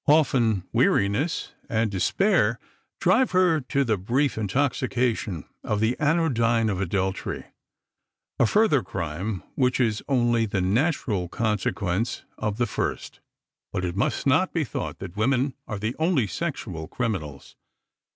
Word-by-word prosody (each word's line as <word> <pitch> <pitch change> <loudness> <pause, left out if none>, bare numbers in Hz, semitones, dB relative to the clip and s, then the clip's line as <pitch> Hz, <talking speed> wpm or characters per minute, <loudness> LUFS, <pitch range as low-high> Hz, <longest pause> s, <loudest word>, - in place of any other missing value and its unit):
Often 125 - +3
weariness 105 - +1 0.2
and 110 -3 +1
despair 115 - +2 0.4
drive 215 +6 +3
her 180 -4 +4
to 140 +2 0
the 110 -6 0
brief 130 +8 +1
intoxication 120 - 0 0.2
of 105 - -1
the 110 +3 +2
anodyne 120 -8 +2
of 95 -1 -2
adultery, 95 +1 -2 0.9
a 120 - +5
further 205 - +3
crime 95 +1 -4
which 125 -1 +1
is 110 -4 +1
only 120 -4 +2
the 100 -1 -1
natural 105 - 0
consequence 105 -1 -1 0.2
of 105 -1 -2
the 120 - +2
first. 110 - -3 0.5
But 90 - -2
it 85 0 -3
must 100 - 0
not 150 +7 +3
be 165 - +1
thought 120 - -4
that 95 -2 -8
women 130 +5 +1
are 105 - -4
the 110 +4 -3
only 160 -7 +2
sexual 95 - -4
criminals. 80 - -4
115 Hz, 130 wpm, -25 LUFS, 100-140 Hz, 0.9 s, a